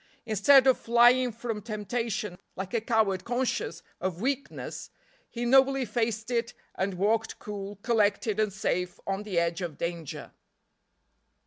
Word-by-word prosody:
Instead 245 Hz, +5 st, +5 dB
of 260 Hz, -1 st, +4 dB
flying 240 Hz, +2 st, +5 dB
from 225 Hz, -1 st, -4 dB
temptation, 215 Hz, -2 st, -3 dB, 0.2 s
like 190 Hz, +2 st, -6 dB
a 230 Hz, -, +1 dB
coward 215 Hz, -5 st, +1 dB
conscious 245 Hz, -8 st, -2 dB, 0.2 s
of 180 Hz, -1 st, -3 dB
weakness, 275 Hz, +5 st, -3 dB, 0.4 s
he 240 Hz, 0 st, -4 dB
nobly 270 Hz, +1 st, +4 dB
faced 225 Hz, 0 st, -2 dB
it 235 Hz, 0 st, -1 dB, 0.2 s
and 190 Hz, 0 st, -2 dB
walked 220 Hz, +4 st, 0 dB
cool, 205 Hz, -1 st, -6 dB
collected 215 Hz, -2 st, +1 dB
and 215 Hz, -1 st, +2 dB
safe 180 Hz, -2 st, -2 dB
on 195 Hz, +1 st, -2 dB
the 205 Hz, -4 st, -4 dB
edge 170 Hz, +1 st, +1 dB
of 170 Hz, -5 st, -4 dB
danger. 170 Hz, -3 st, -5 dB
215 Hz, 135 wpm, -28 LUFS, 195-240 Hz, 0.4 s, Instead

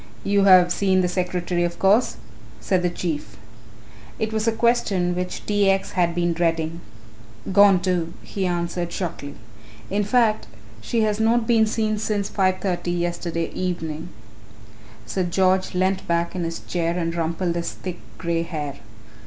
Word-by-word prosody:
"You 200 Hz, 0 st, +3 dB
have 180 Hz, -2 st, +7 dB
seen 190 Hz, -2 st, +2 dB
the 180 Hz, -, +1 dB
secretary 180 Hz, -1 st, -1 dB
of 170 Hz, 0 st, -2 dB
course," 200 Hz, -, +3 dB, 0.4 s
said 185 Hz, -2 st, +1 dB
the 180 Hz, -, +1 dB
Chief. 155 Hz, -, -4 dB, 0.8 s
It 220 Hz, 0 st, -2 dB
was 220 Hz, +1 st, -1 dB
a -, -, +5 dB
question 220 Hz, -6 st, +1 dB
which 180 Hz, +1 st, -4 dB
T. 205 Hz, -1 st, +2 dB
X. 195 Hz, 0 st, +1 dB
had 170 Hz, -2 st, +1 dB
been 175 Hz, -1 st, +1 dB
dreading. 165 Hz, 0 st, -1 dB, 0.7 s
"Gone 200 Hz, -1 st, +7 dB
too," 175 Hz, -2 st, -1 dB
he 195 Hz, -2 st, -2 dB
answered 175 Hz, 0 st, -2 dB
shortly; 150 Hz, -6 st, -5 dB, 0.6 s
"in 205 Hz, +1 st, +1 dB
fact 220 Hz, -, +2 dB, 0.3 s
she 230 Hz, -, 0 dB
has 215 Hz, -1 st, +1 dB
not 225 Hz, +1 st, +3 dB
been 225 Hz, -2 st, +4 dB
seen 215 Hz, -1 st, 0 dB
since 205 Hz, -2 st, -1 dB
5:30 185 Hz, -2 st, 0 dB
yesterday 170 Hz, -1 st, -2 dB
evening." 170 Hz, -2 st, -4 dB, 1.0 s
Sir 110 Hz, -, -2 dB
George 185 Hz, +1 st, +1 dB
leant 185 Hz, +1 st, 0 dB
back 170 Hz, +1 st, 0 dB
in 175 Hz, -2 st, -2 dB
his 165 Hz, 0 st, -4 dB
chair 170 Hz, 0 st, -2 dB
and 165 Hz, -1 st, -1 dB
rumpled 170 Hz, +1 st, -1 dB
his 170 Hz, 0 st, -3 dB
thick 180 Hz, -2 st, -7 dB, 0.2 s
grey 170 Hz, -1 st, -1 dB
hair. 155 Hz, -5 st, -5 dB
180 Hz, 155 wpm, -23 LUFS, 170-200 Hz, 1.0 s, have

